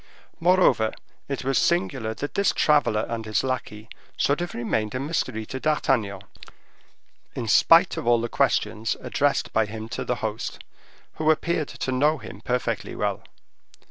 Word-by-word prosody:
Moreover, 175 -11 +3 0.3
it 140 -1 -4
was 135 -1 +2
singular 135 -11 0
that 145 - -5
this 200 -1 +2
traveler 135 -8 +2
and 115 -1 -4
his 110 -3 0
lackey 115 -4 -4 0.3
should 140 +3 +2
have 175 0 -4
remained 110 -2 -1
a - - -1
mystery 130 -6 -2
to 130 - -6
D'Artagnan, 125 -10 0 1.1
in 120 - -3
spite 165 - +5
of - - -4
all 120 -1 +5
the 120 - -2
questions 115 -3 0
addressed 140 +3 0
by 110 -1 +2
him 110 +1 -7
to 110 - -4
the 125 - -1
host, 110 +1 -4 0.6
who 155 0 +1
appeared 155 0 +1
to 130 - -4
know 145 +5 +2
him - - -10
perfectly 125 0 -2
well. - - -2
125 Hz, 155 wpm, -25 LUFS, 110-150 Hz, 1.1 s, spite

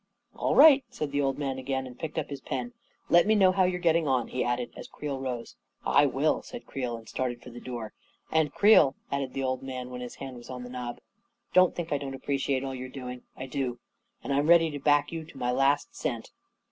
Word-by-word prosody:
44 - - -4
All - - +2
right," 285 -4 +8
said 155 - -4
the 145 0 +1
old 135 -1 0
man 135 -2 -2
again, 130 0 -2
and 125 -1 -11
picked 160 -1 -5
up - - -2
his 140 - -5
;>en. 245 - -2 0.4
44 - - +4
Let 175 +3 +6
me 220 - +5
know 190 -3 +6
how 185 0 +3
you're 180 0 0
getting, 165 -2 +2
on," 130 -3 +1
he 130 - -2
atided, 120 0 -1
as - - -8
Creel 140 -3 -5
rose. 125 -3 -5 0.3
44 - - +4
1 - - -5
will," - - +2
said - - -9
Creel, 125 -3 -3
and 115 - -14
started 125 -2 -2
for 125 - -10
the 120 - -9
door. 120 -3 -6 0.4
44 160 - +4
And, 150 -2 -2
Creel," 180 -10 +6 0.2
added 140 -2 -2
the 135 - -1
old 130 -1 -1
man, 130 -1 -6
when 125 0 -6
his 125 -1 -7
hand 135 -2 -8
was 120 - -12
on 125 -1 -6
the 125 - -9
knob; 125 -1 -5 0.3
" - - -43
don't 185 0 +5
think 170 -3 -3
I 145 - +1
don't 135 -1 -5
appreciate 135 0 -1
all 135 -1 -3
you're 130 0 -6
doing. 125 -2 -7 0.2
I 130 - -5
do. 130 -2 -3 0.5
And 140 - -2
I'm 145 +2 +2
ready 165 -2 +6
to 145 - -5
back 145 +1 +3
you 165 -1 -4
to 155 -2 -14
my 125 -1 0
last 135 +3 +1
cent." 120 -7 -4
135 Hz, 255 wpm, -28 LUFS, 125-150 Hz, 0.5 s, right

